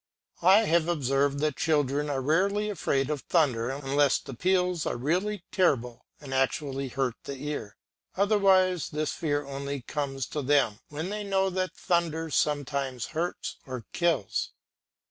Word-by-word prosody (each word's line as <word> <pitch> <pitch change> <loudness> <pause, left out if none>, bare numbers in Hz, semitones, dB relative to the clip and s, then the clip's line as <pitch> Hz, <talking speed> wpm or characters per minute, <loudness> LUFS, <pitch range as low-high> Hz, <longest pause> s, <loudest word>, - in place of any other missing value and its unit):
I 190 +5 +7
have 170 -5 +2
observed 140 -3 +1
that 150 -3 0
children 145 -2 +1
are 135 -2 -1
rarely 200 +8 +1
afraid 135 -7 0
of 145 -3 -2
thunder 130 -9 +2
unless 140 +1 +2
the 135 - -9
peals 180 +3 +1
are - - -1
really 180 +9 -1
terrible 125 -10 +1
and 140 -2 -8
actually 135 +1 0
hurt 130 -1 -1
the 140 - -5
ear, 145 -7 -5 0.4
otherwise 190 -3 +3
this 155 -1 -2
fear 145 -2 -1
only 140 -1 -5
comes 135 -2 -3
to 150 - -3
them 135 -6 +2
when 160 +6 -4
they 210 0 -3
know 195 -1 +1
that 185 -1 -2
thunder 170 -2 0
sometimes 140 -4 0
hurts 170 +3 -3
or 130 -4 -6
kills. 170 - 0
150 Hz, 145 wpm, -28 LUFS, 135-175 Hz, 0.4 s, I